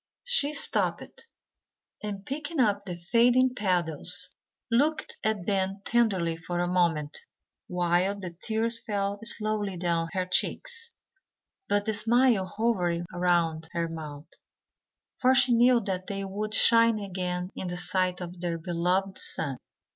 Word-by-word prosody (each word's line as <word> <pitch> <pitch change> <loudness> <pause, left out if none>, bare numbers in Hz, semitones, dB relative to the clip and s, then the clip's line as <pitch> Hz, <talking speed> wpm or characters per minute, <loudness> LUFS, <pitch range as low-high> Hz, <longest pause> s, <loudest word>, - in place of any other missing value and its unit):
She 485 -12 +1
stooped, 285 - -2 0.7
and 200 -2 -5
picking 300 +3 -4
up 205 -4 +2
the 180 - -4
fading 240 +8 +3
petals, 180 -8 0 0.4
looked 295 +7 +1
at 215 -5 0
them 195 0 -1
tenderly 190 -9 +1
for 175 +1 -4
a 175 - +1
moment, 165 -5 +1 0.5
while 180 +3 +1
the 185 -3 -6
tears 230 +1 +2
fell 200 -2 -2
slowly 215 -4 -1
down 170 -1 0
her 185 -1 0
cheeks; 465 - -1 0.8
but 205 0 +1
the 220 - 0
smile 230 -2 +3
hovered 180 -5 0
round 170 -3 +1
her 170 -1 -1
mouth; 150 -2 -7 0.9
for 260 0 +4
she 250 -1 +5
knew 240 +1 +5
that 185 -3 -3
they 195 -1 -3
would 210 +2 -2
shine 230 -1 +5
again 180 -2 -3
in 185 - -5
the 175 0 -3
sight 180 0 -1
of 175 0 -7
their 170 -2 -2
beloved 180 +3 -1
sun. 140 -5 -3
195 Hz, 135 wpm, -27 LUFS, 175-230 Hz, 0.9 s, she